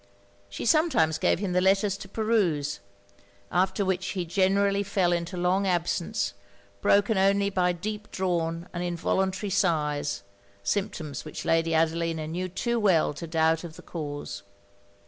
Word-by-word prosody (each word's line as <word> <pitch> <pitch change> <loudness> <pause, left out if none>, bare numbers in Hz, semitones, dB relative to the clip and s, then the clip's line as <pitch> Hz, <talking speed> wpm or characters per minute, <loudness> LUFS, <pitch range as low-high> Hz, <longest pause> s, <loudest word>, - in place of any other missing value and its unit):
She 100 - -5
sometimes 225 - +3
gave - - +3
him 195 0 -2
the 180 - +3
letters 195 +1 +3
to 195 -1 -10
peruse; 195 -10 0 0.7
after 190 +3 +1
which 190 -1 0
he 185 -3 -2
generally 195 +3 +2
fell 190 -3 +1
into 170 +2 -3
long 185 +3 +1
absence, 175 +3 0 0.5
broken 200 - +3
only 200 +1 +3
by 180 -2 +2
deep 210 +4 -5
drawn 170 -2 -1
and 175 0 -3
involuntary 190 +3 -1
sighs 150 - 0 0.4
symptoms 190 - -2
which 155 - -7
Lady 165 0 +2
Adelina 165 0 +1
knew 180 +4 -3
too 235 +6 -1
well 180 -8 +3
to 165 +3 -7
doubt 160 0 +2
of 165 -2 -8
the - - -12
cause. 145 - -6
180 Hz, 145 wpm, -27 LUFS, 165-200 Hz, 0.7 s, sometimes